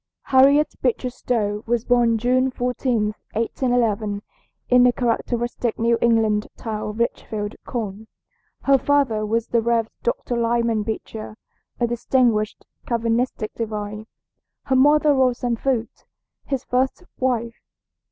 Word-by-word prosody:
HARRIET 280 +3 +5
BEECHER 255 - 0
(STOWE) 215 -4 -2
was 235 0 0
born 240 -2 +3
June 255 +3 +2
14, 245 -4 -1 0.2
1811, 225 -3 0 0.4
in 250 0 +5
the 250 0 +6
characteristic 240 0 -1
New 230 0 +2
England 220 -2 +2
town 215 -2 -4
of 210 - -7
Litchfield, 215 -2 -2
Conn. 220 -3 -4 0.6
Her 275 -1 +4
father 275 -7 +2
was 225 +2 -1
the 235 - +2
Rev. 230 -1 +1
Dr. 240 +1 -2
Lyman 235 -1 +1
Beecher, 215 0 -6 0.4
a 240 - +2
distinguished 235 -2 +1 0.2
Calvinistic 230 -1 -1
divine, 215 -1 -5 0.6
her 265 - 0
mother 295 +3 +5
Roxanna 250 -3 +1
Foote, 250 -4 -2 0.4
his 270 -2 -2
first 260 +7 0 0.2
wife. 235 -3 -1
235 Hz, 120 wpm, -22 LUFS, 220-250 Hz, 0.6 s, the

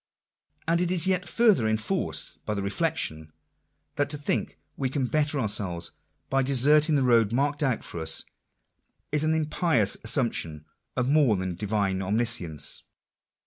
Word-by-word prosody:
And 170 +1 +2
it 180 - 0
is 175 -3 +1
yet 185 -1 0
further 215 - +3
enforced 110 - -2
by 105 - -3
the 100 - -3
reflection, 100 - -2 0.7
that 145 0 +1
to 150 - -3
think 145 - -2 0.2
we 135 -2 -2
can 135 0 -1
better 150 +2 0
our 110 - 0
selves 90 -5 -2 0.4
by 135 0 +1
deserting 145 +4 +4
the 140 - +2
road 115 -4 +3
marked 145 +4 0
out 135 -5 0
for 85 - -6
us, 80 - +3 0.9
is 150 0 +1
an 155 0 +2
impious 155 - +1
assumption 110 - 0 0.3
of 125 -1 +1
more 140 -6 +4
than 95 -1 -3
divine 100 0 -1
omniscience. 100 - -2
125 Hz, 150 wpm, -26 LUFS, 100-150 Hz, 0.9 s, deserting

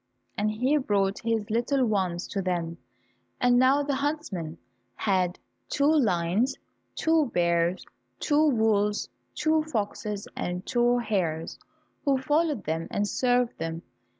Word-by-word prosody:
And 210 +1 0
he 250 +8 +1
brought 200 -7 +1
his 225 -2 -1
little 250 +4 +2
ones 185 -5 -1
to 195 - -2
them, 170 -2 -2 0.6
and 245 0 +4
now 270 +3 +4
the 285 0 -1
huntsmen 265 - -3 0.4
had 185 -3 0 0.3
two 280 - +1
lions, 210 - +1 0.4
two 320 -2 +2
bears, 170 0 +1 0.3
two 305 +1 +3
wolves, 215 -4 +1 0.3
two 315 +1 +2
foxes, 210 -6 -3
and 180 +1 -3
two 240 0 +2
hares, 180 -9 -2 0.4
who 275 -2 +3
followed 295 -1 +1
them 160 +1 -2
and 205 0 -1
served 245 +1 +1
them. 165 +1 -4
215 Hz, 125 wpm, -27 LUFS, 180-265 Hz, 0.6 s, and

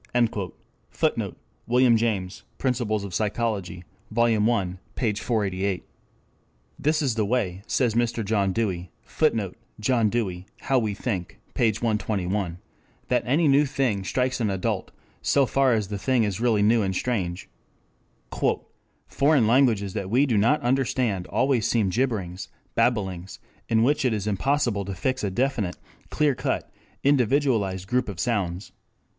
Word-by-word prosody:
[Footnote: - - -1 0.3
Wm. 125 0 +5
James, 105 -5 -1 0.2
Principles 120 -5 0
of 100 -3 -7
Psychology, 100 -4 -2 0.3
Vol. 115 -1 +3
I, 95 -5 -1 0.2
p. 115 -5 0
488.] 100 -4 -1 1.0
This 155 +1 +1
is 130 -4 +1
the 110 -1 0
way, 100 -5 -1
says 120 -4 +1
Mr. 115 -1 0
John 100 -2 +1
Dewey, 95 -5 -2
[Footnote: 110 - 0 0.2
John 115 0 +2
Dewey, 95 -5 -2
How 135 -2 +2
We 110 -4 -2
Think, 95 -7 -4
pg 115 -2 +1
121.] 100 -4 -1 0.5
that - - +3
any 150 +5 +3
new 140 +1 +4
thing 125 -8 0
strikes 125 +5 -1
an 110 - +1
adult, 95 -1 -2 0.3
so 140 -1 +3
far 135 +1 +2
as 105 -3 0
the 100 -1 -4
thing 125 +2 +2
is 105 0 -2
really 115 -4 +3
new 110 +2 +4
and 95 -2 -1
strange. 90 -7 -2 1.6
"Foreign 140 -4 +3
languages 110 -5 +3
that 95 - -3
we 130 +6 +4
do 125 -5 0
not 115 +9 +3
understand 120 -6 0
always 130 -5 +1
seem 105 -5 +1
jibberings, 100 -6 -2 0.3
babblings, 95 -6 0 0.3
in 115 0 +3
which 145 +3 +2
it 125 -3 +2
is 105 -2 -2
impossible 115 +1 0
to 100 0 -5
fix 130 +7 -1
a 100 - +1
definite, 110 -3 -1 0.3
clear 150 -2 +2
cut, 125 - -2 0.3
individualized 125 -8 +2
group 125 +1 0
of 95 -4 -7
sounds. 95 -6 -1
110 Hz, 140 wpm, -25 LUFS, 100-125 Hz, 1.6 s, Wm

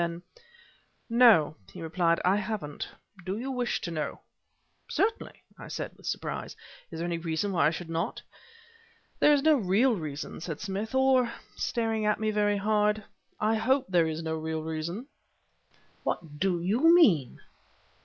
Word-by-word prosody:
Then: 170 0 -3 0.9
"No," 225 -11 +6 0.2
he - - -10
replied; 165 +1 +1
"I 190 +2 +4
haven't. 205 -8 -4 0.3
Do 190 +3 -3
you 260 +4 -4
wish 250 -2 -1
to 170 - -4
know?" 155 -2 -4 0.7
"Certainly," 440 +3 -1 0.2
I - - -9
said - - -5
with - - -12
surprise; - - -4 0.3
"is 165 - -8
there 165 - -2
any 170 -1 -2
reason 165 +4 -1
why 175 -4 +3
I - - +5
should 165 +1 -6
not?" 165 +5 -2 1.0
"There 295 - +6
is 285 -2 +3
no 315 0 +6
real 225 +4 +3
reason," 150 -4 -6
said 165 -3 -5
Smith; 205 +4 -4
"or" 260 -2 +4 0.2
staring 225 -3 -1
at 210 - +2
me 215 0 0
very 205 -1 +2
hard 210 +1 +1 0.4
"I 215 +1 +2
hope 260 +5 +2
there 175 -3 +3
is 160 +1 -4
no 160 0 -2
real 160 0 -3
reason." 160 +8 -4 1.0
"What 150 -4 -4
do 185 -1 +1
you 235 - +4
mean?" 175 - +4
195 Hz, 160 wpm, -28 LUFS, 165-225 Hz, 1.0 s, No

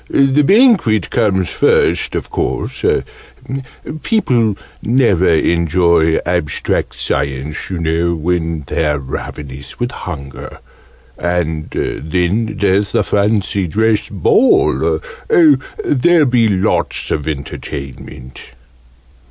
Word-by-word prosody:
The 135 +1 +3
Banquet 180 - +3
comes 100 -6 +1
first, - - +1
of - - -4
course. - - -3 1.2
People 120 - +1 0.2
never 115 -7 +2
enjoy 85 0 +2
Abstract 85 -4 -1
Science, 70 +2 -3
you 95 - -3
know, 85 +1 0
when 80 -1 -2
they're 75 +1 0
ravenous 70 +1 -7
with 120 0 -2
hunger. 70 -6 -8 0.6
And 80 -3 -2
then 90 +8 -2
there's 100 0 +1
the - - +2
Fancy 100 -2 0
Dress 110 +5 +1
Ball. 165 - +2 0.3
Oh, 340 -9 +6 0.3
there'll 155 +4 +3
be 120 -3 +3
lots 95 -3 -1
of 75 - -2
entertainment!" 70 -3 -7
90 Hz, 95 wpm, -16 LUFS, 80-115 Hz, 1.2 s, Oh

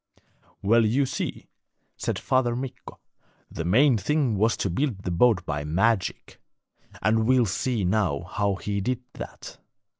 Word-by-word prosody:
'Well, 115 +3 +4
you 125 +6 +2
see,' 130 - -4 0.5
said - - -2
Father 130 -3 +1
Mikko, 130 +1 -7 0.5
'the 80 - -4
main 120 - +4
thing 135 +1 +1
was 110 +3 +2
to 100 - -1
build 115 - -2
the 90 - -2
boat 90 0 +3
by 75 0 -3
magic, 95 +6 -1 0.6
and 110 +1 +2
we'll 130 -2 +4
see 110 +1 -1
now 90 -7 +1
how 100 +2 -1
he 100 +1 -3
did 125 +4 -1
that. - - -9
110 Hz, 145 wpm, -25 LUFS, 95-125 Hz, 0.6 s, Well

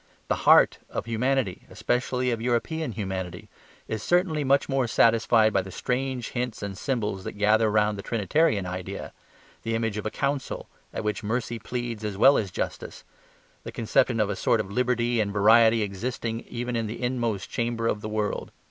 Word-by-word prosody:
The - - +2
HEART - - +6
of - - -4
humanity, 115 -2 -1
especially 125 0 -1
of 115 -1 -2
European 125 +4 -1
humanity, 95 -4 -5 0.4
is 110 -1 -3
certainly 175 - +1
much 140 +1 +3
more 135 -3 +1
satisfied 115 -1 +4
by 95 - +3
the 95 - -9
strange 125 +4 -2
hints 120 -4 -3
and 100 -1 -4
symbols 105 -5 -2
that - - -5
gather 105 +2 +3
round 105 -1 +1
the - - -3
Trinitarian 110 - +1
idea, 90 +2 -6 0.5
the 115 0 -2
image 115 -2 -1
of 105 - -7
a - - -1
council 140 +3 -3 0.2
at - - -4
which 105 0 -2
mercy 115 +2 -2
pleads 120 -1 -4
as 105 -2 -3
well 135 +7 +7
as 100 - -3
justice, - - -5 0.6
the - - -7
conception 115 +1 +1
of 105 -1 +1
a - - -2
sort 115 - +2
of 100 -2 -4
liberty 120 0 +1
and 100 -1 -1
variety 110 +2 +5
existing 115 +3 -3
even 120 +1 -3
in 115 -1 -1
the 110 - -6
inmost 120 -6 -2
chamber 115 -1 -1
of 105 -2 0
the 110 - -5
world. 105 -1 -2
115 Hz, 180 wpm, -26 LUFS, 105-125 Hz, 0.6 s, well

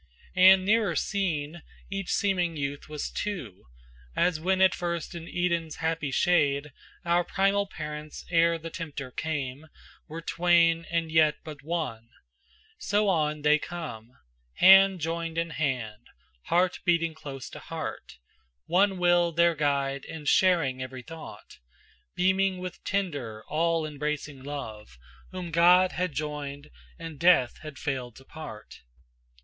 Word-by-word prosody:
And 185 +1 +7
nearer 210 -4 +2
seen 170 -5 -2 0.3
each 195 -2 -4
seeming 180 -5 +1
youth 140 +1 -4
was 150 -1 -4
two, 160 - -5 0.5
As 175 -3 +2
when 185 +3 +1
at 190 -1 +5
first 170 0 -3
in 170 -1 -8
Eden's 170 -3 -1
happy 160 -2 -2
shade 145 -2 +2 0.3
Our 175 +1 +3
primal 200 +2 +1
parents 150 -3 -7
ere 170 0 +4
the 165 0 -8
tempter 150 -6 -6
came 145 -1 -4 0.4
Were 165 +2 -7
twain, 170 -1 +3
and 165 -1 -1
yet 155 -2 +4
but 150 -2 -9
one, 145 -8 -4 0.7
so 205 0 +1
on 150 -4 0
they 150 0 +5
come, 125 -11 -7 0.4
Hand 195 -1 +7
joined 165 +1 -3
in 165 0 -1
hand, 125 -9 -3 0.4
heart 180 +1 +2
beating 170 -2 +2
close 135 -4 -8
to - - -9
heart, - - -7 0.5
One 195 +1 +2
will 175 -1 +3
their 170 +1 +3
guide 140 -2 -1
and 155 -2 -8
sharing 165 -8 +3
every 130 -1 -7
thought, 165 +2 -11 0.6
Beaming 190 +1 +2
with 180 0 -7
tender, 145 - -3
all 165 0 +1
embracing 150 -1 -4
love, 110 - -7 0.3
Whom 180 -2 -6
God 180 +3 +5
had 180 -1 -2
joined 145 0 -5 0.3
and 165 -3 -8
death 170 -8 +4
had 155 -3 -9
failed 130 -6 -4
to 135 - -15
part. 150 -9 -10
165 Hz, 135 wpm, -27 LUFS, 145-175 Hz, 0.7 s, And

